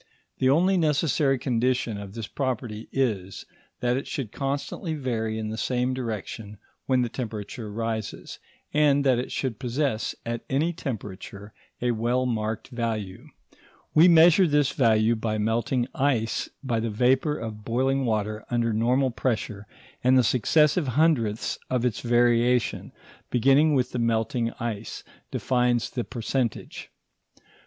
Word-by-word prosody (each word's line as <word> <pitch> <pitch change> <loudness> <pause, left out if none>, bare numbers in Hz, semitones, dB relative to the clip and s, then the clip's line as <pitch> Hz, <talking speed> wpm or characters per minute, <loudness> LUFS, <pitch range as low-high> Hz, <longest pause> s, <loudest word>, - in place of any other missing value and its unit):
The 130 - +3
only 180 +7 +4
necessary 150 -3 +2
condition 120 -3 0
of 100 0 -9
this 115 -2 -4
property 120 -5 -4
is, 105 -8 -2 0.4
that 125 +1 +1
it 135 - -4
should 130 -8 -4
constantly 140 +4 -3
vary 115 -6 -2
in 110 -1 -3
the 110 0 -4
same 125 0 0
direction 110 -3 -5 0.3
when 130 -2 +3
the - - 0
temperature 110 -2 -6
rises, 110 0 -4 0.3
and 145 -2 +4
that 130 -3 +3
it 125 - -4
should 125 -6 -3
possess, 130 -2 -1
at 115 0 -3
any 155 +6 +1
temperature, 105 - -7 0.3
a 125 - +2
well 120 +3 0
marked 110 -2 -2
value. 110 -6 -4 0.7
We 160 +3 +7
measure 170 +2 +7
this 145 -2 +2
value 115 -2 +3
by 110 -1 -2
melting 115 +3 0
ice 130 -6 0
and - - -26
by 115 -3 +1
the 115 +1 -1
vapour 130 +7 +2
of 110 -2 -7
boiling 135 +4 +1
water 110 -2 -1
under 120 -2 +1
normal 125 +4 +2
pressure, 110 -3 -2 0.4
and 130 +1 +5
the 130 - +5
successive 150 - +3
hundredths 120 -10 +1
of 125 -1 0
its 120 -3 0
variation, 120 0 +2 0.4
beginning 135 +5 +4
with 130 -2 +1
the 125 - -3
melting 115 +1 0
ice, 115 -2 -4 0.3
defines 125 -2 +1
the 125 -3 -2
percentage. 120 0 -3
120 Hz, 140 wpm, -26 LUFS, 110-135 Hz, 0.7 s, We